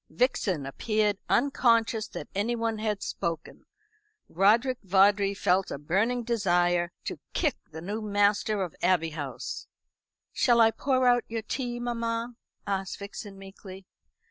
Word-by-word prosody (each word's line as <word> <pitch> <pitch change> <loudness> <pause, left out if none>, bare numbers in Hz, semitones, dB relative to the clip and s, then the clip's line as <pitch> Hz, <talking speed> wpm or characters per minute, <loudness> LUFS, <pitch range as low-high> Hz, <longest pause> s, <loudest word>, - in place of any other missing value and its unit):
Vixen 200 - 0
appeared 210 - 0
unconscious 230 -4 +2
that - - -7
anyone 225 +2 -1
had 215 -2 -2
spoken. 170 -3 -5 0.6
Roderick 225 +8 +3
Vawdrey 195 +1 +3
felt 190 -1 +1
a - - -4
burning 205 - 0
desire 175 -6 +1
to - - -5
kick 305 -5 +1
the 160 +1 -9
new 210 +4 -4
master 205 0 +1
of 175 - -4
the - - -19
Abbey 165 -3 +2
House. 145 -3 -6 0.7
"Shall 240 -3 +3
I 225 -1 +6
pour 255 +1 +1
out 245 -1 +4
your 225 -1 -4
tea, 240 +1 -3
mamma?" 235 0 -2 0.3
asked 195 -1 -2
Vixen 200 0 -8
meekly. 195 0 -11
205 Hz, 135 wpm, -28 LUFS, 190-230 Hz, 0.7 s, I